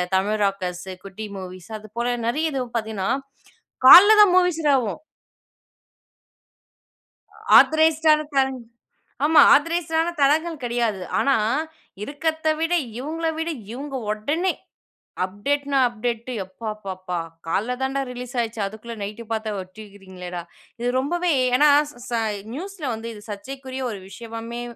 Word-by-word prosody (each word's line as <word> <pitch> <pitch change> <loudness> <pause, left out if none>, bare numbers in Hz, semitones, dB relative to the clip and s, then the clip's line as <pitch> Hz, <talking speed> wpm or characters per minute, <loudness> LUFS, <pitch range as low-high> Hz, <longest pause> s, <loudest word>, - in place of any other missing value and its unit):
தமிழ் 210 +3 +1
ராக்கர்ஸ்ஸு, 185 -1 -3
குட்டி 205 +2 -7
மூவிஸ் 185 +1 -9
அது 215 0 -14
போல 240 +1 0
நிறைய 310 +7 0
இதுவும் 250 -3 -4
பாத்தீங்கன்னா, 215 -4 -3 0.8
காலைல 410 +9 +11
தான் 410 -3 +7
மூவிஸ் 360 -3 +3
இதாகும். 265 -8 +1 2.6
ஆத்தரைஸ்டு 315 0 +4
ஆன 305 - +1
தளங் 265 -1 +1 0.7
ஆமா 315 +1 +7
ஆத்தரைஸ்டு 330 +2 +1
ஆன 335 - 0
தளங்கள் 315 +3 +2
கிடையாது. 235 -5 -1 0.2
ஆனா 275 -1 +3 0.7
இருக்கிறத்த 315 +5 -2
விட, 330 +2 0 0.3
இவுங்கள 320 +5 -3
விட, 325 +1 -2 0.2
இவுங்க 275 +2 -6 0.2
உடனே 295 - -1 0.7
அப்டேட்ன்னா, 280 +9 -1
அப்டேட்டு 235 +1 -4
எப்பாப்பாப்பா! 190 -3 -6 0.3
காலைல்ல 220 +9 -1
தான் 265 +1 -1
டா - - +1
ரிலீஸ் 250 +1 -8
ஆச்சு. 230 -1 -5
அதுக்குள்ள 220 +3 -7
நைட்டு 210 +3 -6
பாத்தா 220 -1 -2
வச்சிருக்கிறீங்களே 190 -1 -10
டா. 175 - -3 0.4
இது 240 +1 -1
ரொம்பவே, 345 +6 0 0.3
ஏன்னா 295 +2 +6 0.2
ஸ - - -18 0.2
ச - - -5 0.4
நியூஸ்ல 375 0 -7
வந்து 225 +1 -7
இது 210 -1 -12
சர்ச்சைக்குரிய 260 +5 -6
ஒரு 205 - -6
விஷயமாமே 230 +3 -7
245 Hz, 125 wpm, -23 LUFS, 210-300 Hz, 2.6 s, காலைல